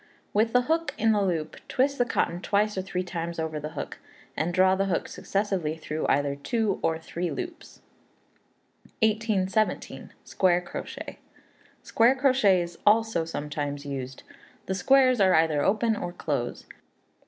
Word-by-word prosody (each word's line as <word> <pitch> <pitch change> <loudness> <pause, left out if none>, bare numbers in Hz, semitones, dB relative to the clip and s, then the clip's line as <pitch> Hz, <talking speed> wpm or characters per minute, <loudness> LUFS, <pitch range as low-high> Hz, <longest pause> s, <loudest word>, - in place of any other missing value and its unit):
With 220 +2 +2
the 250 +1 +3
hook 320 +1 -1
in 225 +1 +3
a 205 -1 +2
loop, 165 -5 -2
twist 275 +2 +1
the 245 - +4
cotton 175 -6 -1
twice 210 +2 +1
or 190 - -1
three 185 -1 -3
times 170 -1 -5
over 160 -1 -3
the 150 +1 -6
hook, - - -5 0.4
and 160 +3 -1
draw 185 +1 +4
the 195 +1 +1
hook 180 - -1
successively 195 -6 -2
through 155 0 -3
either 140 0 +1
two 210 +7 -1
or 160 - +1
three 170 +2 -4
loops. 355 -2 -7 1.2
1817. 215 -1 0
Square 180 -2 +2
Crochet. 175 - -7 0.6
Square 235 +3 +3
crochet 255 -9 +3
is 170 0 -10
also 220 -5 +3
sometimes 145 -2 -4
used. 135 -2 -6 0.4
The 190 - -2
squares 255 +4 +4
are 190 -1 +5
either 160 -2 +3
open 220 +6 +2
or 175 -4 -4
close. 140 -8 -3
185 Hz, 150 wpm, -27 LUFS, 160-220 Hz, 1.2 s, are